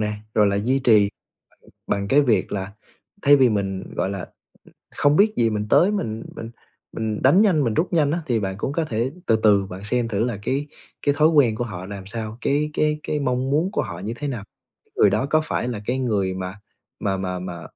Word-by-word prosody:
nè, 105 0 -1 0.2
rồi 105 -1 +4
là 100 0 +1
duy 125 +6 +1
trì 110 -6 +4 0.6
bằng - - -20 0.3
bằng 100 - -4
cái 145 +5 +5
việc 110 -8 +1
là 95 0 -4 0.5
thay 145 0 +7
vì 130 -2 +5
mình, 100 -3 -3
gọi 95 - -1
là, 95 -3 -5 0.7
không 145 +1 +3
biết 215 +3 +4
gì, 115 -1 +2
mình 105 0 -2
tới 190 +4 +5
mình 115 - -3
mình 115 - -7 0.4
mình 110 -1 -3
đánh 155 +10 +5
nhanh, 170 -9 +3
mình 115 -3 0
rút 175 - 0
nhanh 150 -3 +3
á, 170 - 0
thì 115 -3 +1
bạn 95 -1 -3
cũng 130 - -2
có 165 0 0
thể 120 +1 -2
từ 110 - +3
từ 100 -2 +5
bạn 95 +1 -9
xem 120 +2 0
thử 110 0 -1
là 120 -4 -2
cái 140 +6 -2 0.3
cái 145 -1 +1
thói 155 +1 +5
quen 140 -9 +4
của 120 - -2
họ 95 -5 -6
làm 100 -1 -8
sao, 110 +1 -6
cái 150 +2 +1
cái 150 0 +1
cái 150 - -2
mong 130 -1 -1
muốn 160 +7 +1
của - - 0
họ - - -7
như 105 +5 -4
thế 145 - -4
nào. 120 -7 -4 0.4
Cái - - -37
người 100 - +5
đó 105 - 0
có 155 0 +3
phải 120 - -2
là 115 -4 -3
cái 125 +2 -1
người 100 -7 0
mà 95 +2 -6 0.4
mà 95 -1 -1
mà 90 -1 -3
mà, 90 -2 -6
115 Hz, 235 wpm, -22 LUFS, 100-140 Hz, 0.7 s, thay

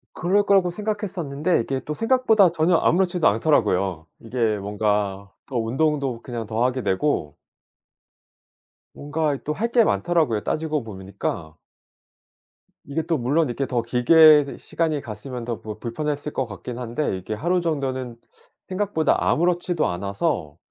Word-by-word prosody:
그럴 190 +4 +2
거라고 195 -3 +3
생각했었는데 185 -6 -2
이게 130 +3 -3
또 150 - -5
생각보다 225 - +4
전혀 170 +1 +2
아무렇지도 180 -1 +2
않더라고요. 100 - +1
이게 115 -2 0
뭔가 100 -1 -1 0.2
더 130 - -4
운동도 135 +1 0
그냥 120 -3 -5
더 110 +2 -1
하게 130 0 0
되고 95 - 0 1.6
뭔가 145 0 -1
이 - - -11
또 150 - -2
할 220 +9 -1
게 235 -2 +5
많더라고요 160 - +1
따지고 155 +2 -1
보니까. 95 -6 -5 1.3
이게 140 +3 -1
또 165 0 -1
물론 145 +5 +1
이렇게 135 +3 -2
더 125 -2 -1
길게 145 +6 +6
더 140 - -8
시간이 160 -3 -1
갔으면 120 +1 -7
더 115 -1 -4
불 110 -1 -8
불편했을 145 +5 -3
것 135 - -1
같긴 115 +3 -8
한데 125 +4 -3
이렇게 95 +3 -5
하루 175 +11 0
정도는 130 -7 -2 0.5
생각보다 190 -4 +1
아무렇지도 175 0 +1
않아서 95 - -2
140 Hz, 320 characters per minute, -23 LUFS, 115-165 Hz, 1.6 s, 길게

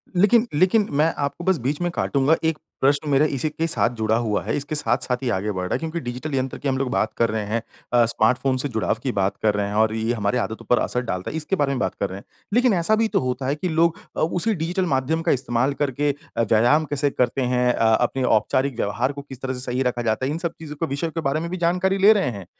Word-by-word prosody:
लेकिन 220 +6 +4
लेकिन 185 +7 +3
मैं 160 +2 +3
आपको 140 +4 -3
बस 190 -2 +3
बीच 140 +5 -2
में 175 - +1
काटूँगा, 145 -1 +2
1 160 -1 +1 0.2
प्रश्न 140 +2 +2
मेरा 140 +2 +4
इसी 150 0 -1
के 160 +2 -2
साथ 160 -7 +2
जुड़ा 110 0 +1
हुआ 105 -2 -1
है। - - -2
इसके 145 +2 -4
साथ-साथ 125 -1 +1
ही 125 - 0
आगे 105 +3 -2
बढ़ 95 -2 -3
रहा - - -3
है - - 0
क्योंकि 165 +1 -4
डिजिटल 125 +4 -5
यंत्र 130 0 -2
की - - -5
हम 135 -1 +1
लोग 135 -1 -1
बात 110 0 0
कर 115 - +2
रहे 110 0 -2
हैं 110 +2 -1 0.3
अ, 120 -1 +5
स्मार्टफ़ोन 125 +4 +2
से 130 - 0
जुड़ाव 110 -2 0
की 130 - 0
बात 95 -2 -1
कर 105 -1 +3
रहे 100 -1 0
हैं 100 - -4
और 110 0 +3
ये 115 +2 0
हमारी 110 +2 0
आदतों 115 -1 -4
पर 125 - +4
असर 125 - -1
डालता 95 -7 -4
है, 160 - -4
इसके 160 +5 -1
बारे 145 -5 0
में 135 - -2
बात - - -1
कर 100 - -1
रहे 95 - -7
हैं। - - -18 0.3
लेकिन 245 -1 +4
ऐसा 180 +5 +2
भी 225 +1 +2
तो - - +1
होता 130 +1 -2
है 140 - +1
कि 180 +4 -3
लोग 165 +1 +2 0.2
अ, - - -1
उसी 180 +7 +1
डिजिटल 175 +3 -1
माध्यम 155 +5 0
का - - +1
इस्तेमाल 125 +1 0
करके 145 +1 +1 0.3
अ, - - +3
व्यायाम 120 +8 +3
कैसे 145 0 0
करते 125 0 0
हैं? 125 -1 +2
अ, - - -5 0.2
अपने 125 +2 0
औपचारिक 125 +4 +1
व्यवहार 105 +6 0
को 140 - -7
किस 135 -2 -12
तरह 130 -1 -2
से 125 - -5
सही 125 0 -1
रखा 120 0 -4
जाता 115 +2 0
है, 135 - -1
इन 155 - -2
सब 170 -1 -3
चीज़ों 150 -2 -8
के 165 +3 -2
विषयों 165 +2 -3
के 165 - -3
बारे 145 +3 0
में 170 +1 -4
भी 185 - -3
जानकारी 190 +3 +1
ले 200 +3 +7
रहे 200 -8 0
हैं। 95 - -9
135 Hz, 275 wpm, -23 LUFS, 120-160 Hz, 0.3 s, ले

